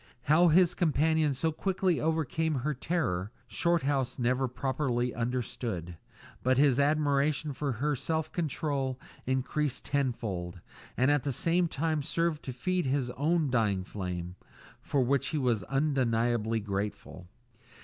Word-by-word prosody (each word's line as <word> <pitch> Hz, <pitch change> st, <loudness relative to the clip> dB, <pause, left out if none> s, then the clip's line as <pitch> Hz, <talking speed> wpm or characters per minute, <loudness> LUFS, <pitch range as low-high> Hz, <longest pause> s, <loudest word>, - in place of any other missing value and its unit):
How 160 Hz, +6 st, +5 dB
his 175 Hz, +2 st, +5 dB
companion 160 Hz, -3 st, +2 dB
so 160 Hz, +5 st, 0 dB
quickly 185 Hz, +1 st, 0 dB
overcame 160 Hz, 0 st, 0 dB
her 140 Hz, +4 st, -1 dB
terror, 125 Hz, -, -1 dB
Shorthouse 145 Hz, -7 st, 0 dB
never 125 Hz, +2 st, +1 dB
properly 125 Hz, -1 st, -1 dB
understood; 115 Hz, -7 st, -3 dB, 0.5 s
but 130 Hz, 0 st, +2 dB
his 140 Hz, -2 st, +4 dB
admiration 145 Hz, 0 st, +2 dB
for 135 Hz, +1 st, -2 dB
her 145 Hz, +6 st, 0 dB
self 160 Hz, +4 st, -2 dB
control 140 Hz, -5 st, -2 dB, 0.3 s
increased 130 Hz, +2 st, -1 dB
tenfold, 105 Hz, -11 st, -2 dB, 0.4 s
and 130 Hz, +3 st, +4 dB
at 145 Hz, -1 st, +3 dB
the 140 Hz, -, -2 dB
same 170 Hz, +7 st, +2 dB
time 155 Hz, 0 st, -1 dB
served 165 Hz, +2 st, -1 dB
to 130 Hz, -, -3 dB
feed 175 Hz, +6 st, -1 dB
his 130 Hz, -2 st, 0 dB
own 155 Hz, +2 st, +1 dB
dying 105 Hz, -6 st, +1 dB
flame 90 Hz, -2 st, -5 dB, 0.4 s
for 140 Hz, -, 0 dB
which 135 Hz, +2 st, +1 dB
he 155 Hz, -, -2 dB
was 120 Hz, -8 st, +1 dB
undeniably 120 Hz, -, +1 dB
grateful. 100 Hz, -3 st, -4 dB
135 Hz, 130 wpm, -30 LUFS, 120-155 Hz, 0.5 s, How